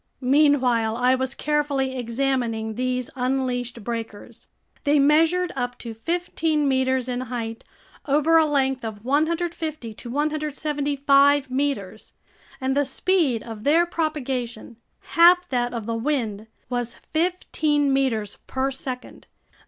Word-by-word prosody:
Meanwhile 250 Hz, -7 st, +3 dB
I 250 Hz, +1 st, +3 dB
was 260 Hz, +1 st, -2 dB
carefully 285 Hz, -3 st, 0 dB
examining 235 Hz, -2 st, -1 dB
these 255 Hz, +1 st, -2 dB
unleashed 250 Hz, -2 st, -2 dB
breakers. 225 Hz, -2 st, -6 dB, 0.4 s
They 290 Hz, 0 st, +3 dB
measured 325 Hz, +5 st, +3 dB
up 245 Hz, -1 st, -3 dB
to 230 Hz, -2 st, -7 dB
fifteen 320 Hz, +2 st, -1 dB
meters 260 Hz, -1 st, +1 dB
in 250 Hz, 0 st, -2 dB
height 230 Hz, -2 st, -5 dB, 0.4 s
over 300 Hz, +3 st, +3 dB
a 315 Hz, -, +3 dB
length 270 Hz, -3 st, 0 dB
of 220 Hz, -1 st, -6 dB
150 310 Hz, -3 st, -1 dB
to 235 Hz, -, -9 dB
175 285 Hz, -1 st, +1 dB
meters, 255 Hz, -7 st, -2 dB, 0.5 s
and 265 Hz, 0 st, -1 dB
the 285 Hz, -, +3 dB
speed 280 Hz, -, +1 dB
of 220 Hz, -2 st, -8 dB
their 325 Hz, +6 st, +4 dB
propagation 265 Hz, -9 st, -3 dB, 0.2 s
(half 355 Hz, +1 st, +5 dB
that 245 Hz, -2 st, 0 dB
of 230 Hz, -3 st, -5 dB
the 230 Hz, -, -2 dB
wind) 225 Hz, -4 st, -2 dB, 0.2 s
was 245 Hz, -1 st, -3 dB, 0.2 s
fifteen 315 Hz, -4 st, +1 dB
meters 240 Hz, -6 st, 0 dB
per 265 Hz, +1 st, -1 dB
second. 260 Hz, -1 st, -7 dB
265 Hz, 120 wpm, -24 LUFS, 240-295 Hz, 0.5 s, half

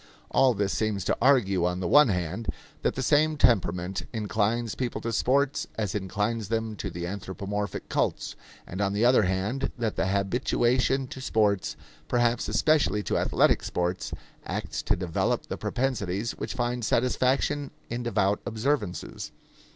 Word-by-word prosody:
All 130 Hz, -3 st, +4 dB
this 100 Hz, -1 st, 0 dB
seems 110 Hz, -4 st, -1 dB
to -, -, +1 dB
argue, 110 Hz, -9 st, +4 dB
on 90 Hz, +1 st, 0 dB
the 95 Hz, -, -2 dB
one 150 Hz, -1 st, +7 dB
hand, 90 Hz, +2 st, -2 dB, 0.3 s
that -, -, 0 dB
the 130 Hz, -, -2 dB
same 155 Hz, +3 st, +3 dB
temperament 95 Hz, -6 st, +2 dB
inclines 110 Hz, +1 st, 0 dB
people 125 Hz, -2 st, -3 dB
to 115 Hz, 0 st, -3 dB
sports 140 Hz, +5 st, +1 dB
as 105 Hz, -5 st, -2 dB
inclines 105 Hz, +2 st, -2 dB
them 110 Hz, -1 st, -1 dB
to -, -, -4 dB
the 85 Hz, 0 st, -5 dB
anthropomorphic 100 Hz, +2 st, -4 dB
cults, -, -, -1 dB, 0.3 s
and 95 Hz, +3 st, -5 dB
on 100 Hz, 0 st, +1 dB
the 105 Hz, +3 st, +2 dB
other 125 Hz, -1 st, +6 dB
hand 95 Hz, +7 st, -1 dB
that 115 Hz, -3 st, -2 dB
the -, -, +1 dB
habituation 120 Hz, +6 st, +1 dB
to 130 Hz, -, -8 dB
sports, 100 Hz, -10 st, +1 dB, 0.3 s
perhaps 120 Hz, +2 st, +1 dB
especially 150 Hz, -9 st, +2 dB
to -, -, 0 dB
athletic -, -, +3 dB
sports, 90 Hz, +1 st, -2 dB, 0.3 s
acts -, -, -4 dB
to -, -, +1 dB
develop 90 Hz, -2 st, -1 dB
the -, -, -4 dB
propensities 115 Hz, -5 st, -1 dB
which -, -, -5 dB
find 120 Hz, 0 st, -1 dB
satisfaction 130 Hz, +4 st, +1 dB, 0.2 s
in 120 Hz, +1 st, -2 dB
devout 105 Hz, -4 st, +1 dB
observances. 115 Hz, -4 st, -2 dB
110 Hz, 150 wpm, -27 LUFS, 100-125 Hz, 0.3 s, one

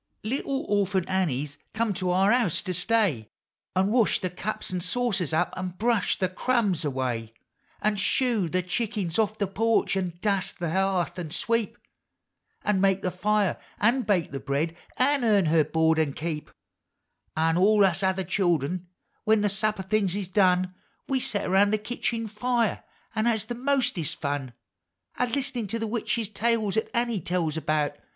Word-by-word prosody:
Little 270 Hz, +4 st, -2 dB
Orphant 195 Hz, -3 st, +1 dB
Annie's 150 Hz, -6 st, -1 dB, 0.2 s
come 225 Hz, -2 st, +1 dB
to 185 Hz, 0 st, -2 dB
our 190 Hz, +3 st, +4 dB
house 200 Hz, -10 st, +2 dB
to 185 Hz, -, -2 dB
stay, 180 Hz, -, +1 dB, 0.5 s
An' 190 Hz, +2 st, +2 dB
wash 235 Hz, -2 st, +3 dB
the 185 Hz, -, -3 dB
cups 190 Hz, +3 st, -4 dB
and 180 Hz, -1 st, -2 dB
saucers 195 Hz, -, 0 dB
up, 160 Hz, -, +1 dB
an' 185 Hz, -1 st, -4 dB
brush 230 Hz, -2 st, +1 dB
the 185 Hz, -, +1 dB
crumbs 195 Hz, -3 st, 0 dB
away, 125 Hz, -5 st, -2 dB, 0.5 s
An' 210 Hz, 0 st, +2 dB
shoo 210 Hz, -1 st, +1 dB
the 185 Hz, +2 st, 0 dB
chickens 195 Hz, -1 st, -2 dB
off 215 Hz, 0 st, +1 dB
the 200 Hz, -, +1 dB
porch, 220 Hz, +2 st, +1 dB
an' 180 Hz, -3 st, -2 dB
dust 195 Hz, -1 st, 0 dB
the 170 Hz, -3 st, -2 dB
hearth, 185 Hz, -1 st, 0 dB
an' 170 Hz, -3 st, -4 dB
sweep. 230 Hz, +6 st, -1 dB, 0.9 s
An' 200 Hz, -2 st, +1 dB
make 195 Hz, 0 st, +2 dB
the 185 Hz, -, 0 dB
fire, 205 Hz, +2 st, +1 dB, 0.2 s
an' 235 Hz, +5 st, +3 dB
bake 200 Hz, -7 st, 0 dB
the 135 Hz, -, -4 dB
bread, 145 Hz, +5 st, -1 dB, 0.2 s
an' 275 Hz, +1 st, +2 dB
earn 205 Hz, -5 st, +4 dB
her 160 Hz, 0 st, +4 dB
board 160 Hz, +1 st, +2 dB
an' 150 Hz, -3 st, +1 dB
keep; 155 Hz, -1 st, -4 dB
Hill -, -, -23 dB
POEUX -, -, -31 dB
OF -, -, +1 dB
HOME, 165 Hz, +1 st, +2 dB
Au' -, -, +2 dB
all 210 Hz, -2 st, +5 dB
us 185 Hz, 0 st, +1 dB
other 190 Hz, 0 st, +1 dB
childern, 175 Hz, -2 st, 0 dB, 0.4 s
when 220 Hz, -1 st, +4 dB
the 205 Hz, -, +2 dB
supper 205 Hz, 0 st, -1 dB
things 195 Hz, -1 st, +1 dB
is 200 Hz, -2 st, -3 dB
done. 185 Hz, -1 st, +3 dB, 0.3 s
We 270 Hz, -1 st, +1 dB
set 205 Hz, -5 st, -2 dB
around 195 Hz, +2 st, +4 dB
the 215 Hz, -, +2 dB
kitchen 230 Hz, +1 st, -3 dB
fire 230 Hz, +1 st, 0 dB, 0.3 s
an' 215 Hz, 0 st, 0 dB
has 220 Hz, -3 st, +1 dB
the 240 Hz, -, -4 dB
mostest 240 Hz, -, 0 dB
fun 140 Hz, -4 st, -3 dB, 0.7 s
A 250 Hz, -, +2 dB
Iist'nin' 250 Hz, -3 st, -2 dB
to 230 Hz, -, -1 dB
the 225 Hz, -, -2 dB
witch 225 Hz, -1 st, -2 dB
tales 220 Hz, -2 st, +1 dB
'at 220 Hz, -, 0 dB
Annie 235 Hz, -4 st, 0 dB
tells 165 Hz, -2 st, -1 dB
about. 150 Hz, -2 st, -1 dB
195 Hz, 180 wpm, -26 LUFS, 175-220 Hz, 0.9 s, all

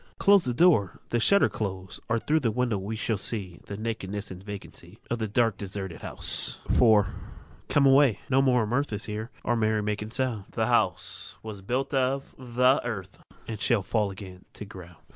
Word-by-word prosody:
Close 200 Hz, -4 st, +5 dB
the 125 Hz, -, -1 dB
door, 120 Hz, -, +3 dB
the 120 Hz, -, +1 dB
shutters 200 Hz, -, +4 dB
close, 95 Hz, -3 st, -5 dB
Or 115 Hz, -, +2 dB
throÆ 155 Hz, +7 st, +1 dB
the 120 Hz, -, +1 dB
windows 115 Hz, -3 st, -1 dB
we 105 Hz, +3 st, -4 dB
shall 110 Hz, -1 st, -1 dB
see 100 Hz, -4 st, -4 dB
The 100 Hz, -, -6 dB
nakedness 105 Hz, -2 st, -4 dB
and 95 Hz, 0 st, -9 dB
vacancy 100 Hz, -2 st, -10 dB
Of 120 Hz, -, -1 dB
the 110 Hz, -, -1 dB
dark 115 Hz, 0 st, +1 dB
deserted 95 Hz, -4 st, -6 dB
house. -, -, +2 dB
IV. 110 Hz, -4 st, +5 dB, 0.6 s
Come 145 Hz, -, +3 dB
away; 135 Hz, -5 st, +5 dB
no 135 Hz, 0 st, +3 dB
more 125 Hz, -3 st, +3 dB
of 105 Hz, -, -4 dB
mirth 140 Hz, +3 st, 0 dB
Is 105 Hz, 0 st, -3 dB
here 110 Hz, +1 st, -5 dB
or 120 Hz, -, +1 dB
merry 110 Hz, -2 st, +1 dB
making 105 Hz, 0 st, -3 dB
sound. 120 Hz, -4 st, -2 dB
The 110 Hz, -, 0 dB
house 100 Hz, -6 st, -1 dB
was 105 Hz, -3 st, -7 dB
builded 125 Hz, +9 st, -2 dB
of 135 Hz, +1 st, -1 dB
the 125 Hz, +1 st, +2 dB
earth, 100 Hz, -6 st, -6 dB, 0.3 s
And 110 Hz, -2 st, -6 dB
shall 110 Hz, -3 st, +2 dB
fall 105 Hz, 0 st, 0 dB
again 95 Hz, -1 st, -10 dB
to 105 Hz, -, -8 dB
ground. 90 Hz, -3 st, -12 dB
110 Hz, 190 wpm, -27 LUFS, 100-125 Hz, 0.6 s, Close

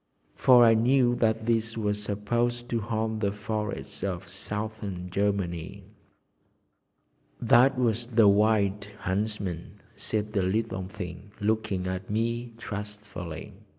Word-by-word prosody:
For 125 Hz, -2 st, +6 dB
I 115 Hz, -, +7 dB
knew 120 Hz, +2 st, +4 dB
that 110 Hz, -1 st, +1 dB
these 115 Hz, 0 st, 0 dB
were 105 Hz, -2 st, +1 dB
supposed 120 Hz, +4 st, -1 dB
to 115 Hz, -, 0 dB
haunt 110 Hz, 0 st, -2 dB
the 100 Hz, -2 st, +1 dB
forests 105 Hz, -2 st, -4 dB
of 90 Hz, -3 st, -3 dB
Southern 100 Hz, -1 st, -5 dB
Germany. 100 Hz, -1 st, -1 dB, 1.6 s
"That 125 Hz, +3 st, +5 dB
was 120 Hz, -1 st, +1 dB
the 115 Hz, -3 st, +5 dB
Wild 100 Hz, -1 st, +3 dB, 0.2 s
Huntsman," 95 Hz, -3 st, -3 dB, 0.2 s
said 105 Hz, -1 st, -3 dB
the 100 Hz, -, +2 dB
little 95 Hz, 0 st, -1 dB
thing, 95 Hz, 0 st, -8 dB
looking 105 Hz, -3 st, 0 dB
at 95 Hz, 0 st, -4 dB
me 115 Hz, +2 st, -1 dB
trustfully. 105 Hz, -6 st, -7 dB
105 Hz, 120 wpm, -28 LUFS, 100-115 Hz, 1.6 s, I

